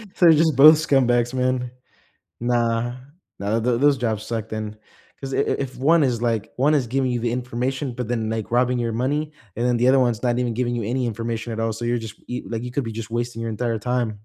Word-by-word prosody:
So, 180 Hz, -, +3 dB
they're 165 Hz, -, +9 dB
just 160 Hz, -1 st, +3 dB
both 150 Hz, +4 st, +10 dB
scumbags, 130 Hz, -5 st, +2 dB
man. 125 Hz, -1 st, 0 dB, 0.7 s
Nah, 120 Hz, 0 st, 0 dB, 0.4 s
nah, 105 Hz, +3 st, 0 dB
th 120 Hz, 0 st, +1 dB
those 145 Hz, -1 st, +4 dB
jobs 110 Hz, -3 st, -2 dB
suck 110 Hz, -2 st, -4 dB
then, 110 Hz, -1 st, -5 dB, 0.4 s
'cause 135 Hz, -1 st, -5 dB
i -, -, 0 dB
if 135 Hz, -1 st, -1 dB
one 160 Hz, +5 st, +4 dB
is, 120 Hz, -4 st, 0 dB
like 115 Hz, -2 st, -1 dB
one 140 Hz, +4 st, +3 dB
is 135 Hz, -4 st, +1 dB
giving 130 Hz, +1 st, 0 dB
you 120 Hz, -1 st, -1 dB
the 120 Hz, -, -1 dB
information, 125 Hz, +2 st, -2 dB
but 125 Hz, -3 st, -4 dB
then, 115 Hz, -2 st, -1 dB
like, 110 Hz, -1 st, -3 dB
robbing 125 Hz, +1 st, +2 dB
your 115 Hz, -1 st, -1 dB
money, 145 Hz, +6 st, -1 dB, 0.3 s
and 120 Hz, -, 0 dB
then 125 Hz, -1 st, +2 dB
the 120 Hz, -, +2 dB
other 135 Hz, +1 st, +5 dB
one's 120 Hz, -3 st, +1 dB
not 120 Hz, -1 st, +1 dB
even 120 Hz, -2 st, -1 dB
giving 120 Hz, 0 st, -1 dB
you 115 Hz, -, -2 dB
any 125 Hz, +3 st, -1 dB
information 115 Hz, 0 st, -4 dB
at 115 Hz, -, -4 dB
all, 115 Hz, 0 st, 0 dB
so, 120 Hz, -, -6 dB
you're 120 Hz, 0 st, 0 dB
just, 115 Hz, -2 st, -7 dB
e 125 Hz, -, -4 dB
like, 115 Hz, 0 st, -3 dB
you 125 Hz, -, -6 dB
could 140 Hz, +2 st, -1 dB
be 115 Hz, -, -5 dB
just 110 Hz, 0 st, -6 dB
wasting 120 Hz, 0 st, -3 dB
your 115 Hz, -, -3 dB
entire 115 Hz, +1 st, -2 dB
time. 125 Hz, +1 st, -1 dB
120 Hz, 240 wpm, -22 LUFS, 115-130 Hz, 0.7 s, both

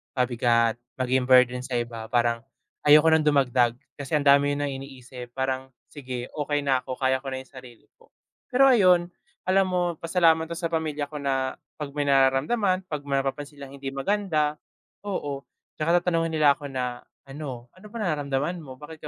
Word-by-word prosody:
pabigat, 120 Hz, -2 st, +2 dB, 0.2 s
maging 130 Hz, 0 st, 0 dB
burden 125 Hz, -1 st, +5 dB
sa 130 Hz, -1 st, -4 dB
iba. 115 Hz, -2 st, -6 dB
Parang 120 Hz, -1 st, +1 dB, 0.4 s
ayoko 150 Hz, +2 st, +7 dB
ng 160 Hz, -1 st, +3 dB
dumagdag, 125 Hz, -5 st, +3 dB, 0.2 s
kasi 140 Hz, +1 st, -6 dB
ang 150 Hz, -, +1 dB
dami 140 Hz, +1 st, +5 dB
niyo -, -, -4 dB
ng 145 Hz, -, -2 dB
iniisip, 125 Hz, -2 st, -11 dB
parang, 130 Hz, 0 st, -3 dB, 0.2 s
"Sige 130 Hz, -4 st, -6 dB
okey 145 Hz, -1 st, -1 dB
na 135 Hz, -2 st, +2 dB
ako, 130 Hz, -1 st, -4 dB
kaya 130 Hz, 0 st, +3 dB
ko 135 Hz, -, -11 dB
na 130 Hz, -, -4 dB
yung 130 Hz, -, -18 dB
sarili 125 Hz, -4 st, -14 dB
ko." -, -, -23 dB, 0.4 s
Pero 270 Hz, +2 st, +5 dB
ayon, 180 Hz, -8 st, +4 dB, 0.4 s
alam 190 Hz, +1 st, +4 dB
mo 180 Hz, -1 st, 0 dB, 0.2 s
pasalamat 165 Hz, -1 st, +3 dB
ako 170 Hz, -, -5 dB
sa 165 Hz, 0 st, -3 dB
pamilya 155 Hz, -3 st, -2 dB
ko 150 Hz, -, -7 dB
na 135 Hz, -2 st, -1 dB, 0.2 s
'pag 150 Hz, -, -3 dB
may 145 Hz, 0 st, -2 dB
nararamdaman, 145 Hz, -, +2 dB
'pag 150 Hz, -4 st, -4 dB
may 140 Hz, -1 st, 0 dB
mapapansin 145 Hz, +2 st, -4 dB
silang 140 Hz, -1 st, -9 dB
hindi 135 Hz, -1 st, -5 dB
maganda 155 Hz, 0 st, 0 dB, 0.5 s
oo, 145 Hz, -9 st, -3 dB, 0.4 s
tsaka 170 Hz, +3 st, +2 dB
tatanungin 165 Hz, -2 st, 0 dB
nila 150 Hz, -2 st, +6 dB
ako 145 Hz, -, -10 dB
na 125 Hz, -2 st, -4 dB, 0.3 s
ano, 135 Hz, -4 st, -7 dB
"Ano 185 Hz, +3 st, -18 dB
ba -, -, -5 dB
nararamdaman 150 Hz, -2 st, -1 dB
mo? 135 Hz, -4 st, -10 dB
Bakit 150 Hz, +2 st, -11 dB
140 Hz, 180 wpm, -25 LUFS, 130-160 Hz, 0.5 s, ayoko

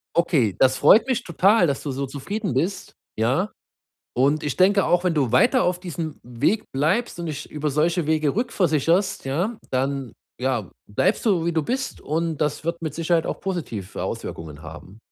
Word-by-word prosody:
Okay, 140 Hz, -, +2 dB
das 130 Hz, 0 st, +4 dB
freut 200 Hz, -, +6 dB
mich 255 Hz, -2 st, 0 dB
total, 185 Hz, +3 st, +3 dB
dass 140 Hz, -, -1 dB
du 140 Hz, -, -2 dB
so 135 Hz, +1 st, -3 dB
zufrieden 200 Hz, -, -4 dB
bist, 190 Hz, +4 st, -2 dB, 0.2 s
ja? 130 Hz, -, +1 dB, 0.6 s
Und 140 Hz, +5 st, +2 dB
ich 145 Hz, -3 st, -2 dB
denke 195 Hz, +1 st, +4 dB
auch, 175 Hz, +1 st, +2 dB
wenn 180 Hz, -2 st, +2 dB
du 135 Hz, -6 st, +1 dB
weiter 250 Hz, -, +4 dB
auf 180 Hz, 0 st, +1 dB
diesem 165 Hz, -4 st, -5 dB
Weg 125 Hz, -, 0 dB
bleibst 170 Hz, -, 0 dB
und 170 Hz, -, -4 dB
dich 150 Hz, -1 st, -6 dB
über 150 Hz, 0 st, -2 dB
solche 165 Hz, +3 st, +1 dB
Wege 155 Hz, -1 st, +1 dB
rückversicherst, 185 Hz, -, +1 dB
ja, 180 Hz, -, -1 dB
dann, 135 Hz, -2 st, -1 dB, 0.3 s
ja, 125 Hz, -7 st, -1 dB, 0.2 s
bleibst 105 Hz, -, 0 dB
du, 180 Hz, -6 st, +3 dB
wie 170 Hz, -, +1 dB
du 160 Hz, -2 st, +1 dB
bist 265 Hz, -, -3 dB
und 160 Hz, +1 st, -1 dB
das 150 Hz, 0 st, -1 dB
wird 170 Hz, +1 st, -2 dB
mit 155 Hz, -2 st, -3 dB
Sicherheit 165 Hz, 0 st, +1 dB
auch -, -, -4 dB
positive 150 Hz, -, -4 dB
Auswirkungen 75 Hz, -2 st, -6 dB
haben. 85 Hz, +6 st, -11 dB
160 Hz, 180 wpm, -23 LUFS, 135-185 Hz, 0.6 s, freut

